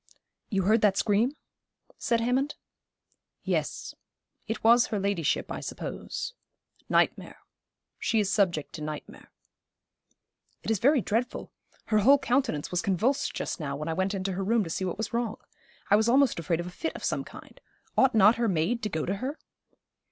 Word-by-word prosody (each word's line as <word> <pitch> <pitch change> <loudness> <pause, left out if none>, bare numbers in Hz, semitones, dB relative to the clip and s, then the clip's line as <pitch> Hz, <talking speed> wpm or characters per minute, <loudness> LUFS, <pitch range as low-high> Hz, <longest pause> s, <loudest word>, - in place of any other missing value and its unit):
'You 195 -4 0
heard 215 +4 +3
that 200 -2 +3
scream?' 225 +10 +2 0.6
said 235 -2 +1
Hammond. 260 +5 0 0.9
'Yes. - - -2 0.5
It 220 0 -4
was 235 +2 +6
her 210 - -2
ladyship, 195 -6 0
I - - -3
suppose. - - -5 0.6
Nightmare. - - +1 0.6
She 225 - +1
is 200 -2 +1
subject 175 -8 +1
to 155 - -7
nightmare.' 150 0 -7 1.3
'It - - -1
is 220 - +1
very 275 +3 +4
dreadful. 230 +5 -2 0.3
Her 215 -1 +2
whole 270 +7 +6
countenance 255 - 0
was 180 0 0
convulsed 220 +9 0
just - - -3
now, 140 -3 -3
when 150 +2 -5
I - - 0
went 190 +4 -1
into 195 0 -2
her 190 +1 -2
room 225 +2 +2
to 165 - -6
see 190 - -2
what 180 - -3
was 220 - -4
wrong. 235 -2 -1 0.5
I - - +8
was 220 +2 +3
almost 265 -5 +4
afraid 170 0 -1
of 175 - -3
a 180 - -7
fit 325 - -4
of - - -8
some - - -1
kind. - - -13 0.3
Ought 265 -3 +4
not 215 +2 +6
her 235 -1 +1
maid 195 +6 0
to 210 - -2
go 160 -5 -2
to 195 +2 -2
her?' 270 +8 -4
210 Hz, 175 wpm, -28 LUFS, 185-240 Hz, 1.3 s, I